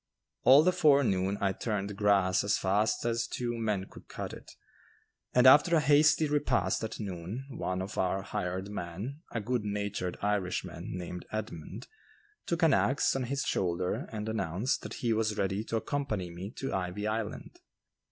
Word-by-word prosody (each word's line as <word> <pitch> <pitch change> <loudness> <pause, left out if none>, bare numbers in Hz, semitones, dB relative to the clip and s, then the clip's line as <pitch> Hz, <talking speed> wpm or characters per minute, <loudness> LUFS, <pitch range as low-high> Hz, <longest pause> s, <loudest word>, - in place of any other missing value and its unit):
All 135 +5 +7
the 185 - +4
forenoon 140 - +3
I 100 -1 +2
turned 105 -2 -3
grass 100 -3 +3
as 100 +1 +2
fast 105 +4 +1
as 115 -1 0
two 120 -1 -3
men 105 -4 -1
could - - -15
cut - - -6
it, - - -11 0.8
and 125 0 +4
after 150 +6 +7
a - - +5
hasty 150 +2 +4
repast 130 - +1
at 110 - -5
noon, 100 +5 -5
one 95 -6 -3
of 100 +3 -5
our 95 +1 0
hired 95 -1 -3
men, 105 - -5
a 115 - -2
good 120 +1 -1
natured 100 -3 -3
Irishman, 100 -3 -2
named 90 0 -7
Edmund, 105 -7 -6 0.6
took 170 0 -1
an 160 -4 +6
axe 135 +1 +2
on 130 -1 -1
his 140 +3 -2
shoulder 90 -1 -1
and 110 -1 -4
announced 110 +1 -1
that - - -7
he 115 - +3
was 110 -1 0
ready 95 +1 0
to 115 - -3
accompany 110 -9 -2
me 90 +3 -7
to 135 - -3
"Ivy 95 +2 -2
Island." 110 - -4
105 Hz, 165 wpm, -30 LUFS, 95-125 Hz, 0.8 s, All